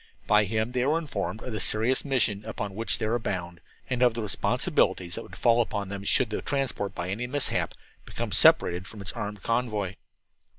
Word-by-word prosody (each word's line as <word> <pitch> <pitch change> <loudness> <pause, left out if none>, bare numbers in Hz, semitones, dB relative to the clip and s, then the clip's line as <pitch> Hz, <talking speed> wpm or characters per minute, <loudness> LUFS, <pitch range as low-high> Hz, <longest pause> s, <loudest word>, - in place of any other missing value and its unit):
By 105 0 +4
him 110 +3 -1
they 125 0 0
were 150 +5 +2
informed 110 - -4
of 125 - -5
the 110 - -2
serious 115 +4 +2
mission 120 -7 +1
upon 105 -2 -4
which 115 +3 0
they - - -2
were 115 +3 +1
bound, 90 -5 -4 0.3
and 125 -1 -2
of 120 -2 +4
the 115 - -2
responsibilities 90 -3 +1
that 115 - -1
would - - -12
fall 120 0 +4
upon 105 -4 -3
them 100 0 -5
should 120 +2 +3
the - - -2
transport, 125 -8 -2
by 85 +1 -4
any 115 +5 -3
mishap, 145 +2 0 0.3
become - - -5
separated 90 +2 +5
from 105 - -9
its 100 0 -3
armed 105 -2 -6
convoy. 110 -5 -1
110 Hz, 200 wpm, -27 LUFS, 100-125 Hz, 0.3 s, separated